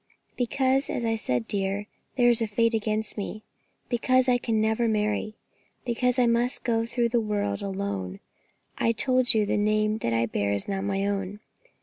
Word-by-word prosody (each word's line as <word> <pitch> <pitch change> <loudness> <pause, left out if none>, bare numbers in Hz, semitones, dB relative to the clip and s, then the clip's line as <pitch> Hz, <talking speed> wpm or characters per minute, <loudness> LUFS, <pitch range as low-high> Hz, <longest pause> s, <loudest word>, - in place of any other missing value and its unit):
"Because, 265 +2 +1
as 240 - -2
I 225 - +1
said, 125 - -1
dear, 195 0 -1 0.3
there 245 -2 +4
is 235 -1 +4
a 225 - +1
fate 230 +2 +1
against 215 0 -1
me; 210 +1 -5 0.4
because 255 +1 +2
I 245 -1 +3
can 225 -2 0
never 220 +2 +1
marry; 215 0 -1 0.5
because 250 +1 +1
I 250 - +4
must 235 +2 +1
go 230 -1 0
through 235 0 0
the 240 0 +2
world 205 - -2
alone. 190 - -4 0.6
I 230 - +2
told 255 +1 +2
you 215 -1 +3
that - - -3
the - - +2
name 215 +1 +1
I 115 0 +1
bear 100 -2 -1
is 100 - -2
not 195 -1 -2
my 195 0 0
own. 200 0 -2
220 Hz, 185 wpm, -26 LUFS, 200-240 Hz, 0.6 s, there